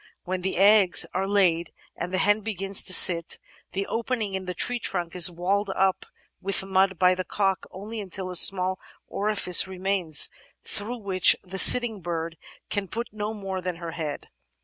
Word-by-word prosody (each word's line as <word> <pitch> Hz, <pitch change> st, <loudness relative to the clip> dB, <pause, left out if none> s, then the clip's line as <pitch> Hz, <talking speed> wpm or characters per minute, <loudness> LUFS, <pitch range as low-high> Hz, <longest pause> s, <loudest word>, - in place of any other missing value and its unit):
When 185 Hz, 0 st, -5 dB
the 190 Hz, -1 st, -4 dB
eggs 200 Hz, -1 st, +4 dB
are 190 Hz, +2 st, -3 dB
laid 180 Hz, -5 st, 0 dB, 0.2 s
and 175 Hz, -, -7 dB
the 185 Hz, -, -2 dB
hen 205 Hz, +2 st, +1 dB
begins 195 Hz, -2 st, +1 dB
to -, -, +2 dB
sit, 170 Hz, -2 st, +6 dB, 0.4 s
the 195 Hz, +1 st, -3 dB
opening 225 Hz, -3 st, -4 dB
in 190 Hz, 0 st, -5 dB
the 180 Hz, 0 st, -7 dB
tree 245 Hz, +7 st, -2 dB
trunk 175 Hz, -5 st, -5 dB
is 180 Hz, 0 st, +5 dB
walled 190 Hz, +4 st, -3 dB
up 190 Hz, 0 st, -2 dB, 0.3 s
with 195 Hz, 0 st, +1 dB
mud 190 Hz, -1 st, 0 dB
by 180 Hz, +1 st, +3 dB
the 185 Hz, 0 st, -5 dB
cock 195 Hz, 0 st, -3 dB
until 185 Hz, -, -11 dB
only 215 Hz, +2 st, -8 dB
a 185 Hz, -1 st, -6 dB
small 185 Hz, +1 st, +5 dB, 0.3 s
orifice 200 Hz, -4 st, +2 dB
remains 185 Hz, -4 st, +1 dB, 0.3 s
through 225 Hz, +5 st, -5 dB
which 195 Hz, -4 st, +3 dB
the 190 Hz, +1 st, -7 dB
sitting 230 Hz, -3 st, +4 dB
bird 165 Hz, -1 st, -6 dB, 0.4 s
can 205 Hz, -2 st, -3 dB
put 235 Hz, +5 st, -6 dB
no 215 Hz, +1 st, -6 dB
more 195 Hz, -2 st, -6 dB
than 180 Hz, -1 st, -5 dB
her 170 Hz, -1 st, -8 dB
head. 155 Hz, -3 st, -7 dB
190 Hz, 175 wpm, -24 LUFS, 180-205 Hz, 0.4 s, sit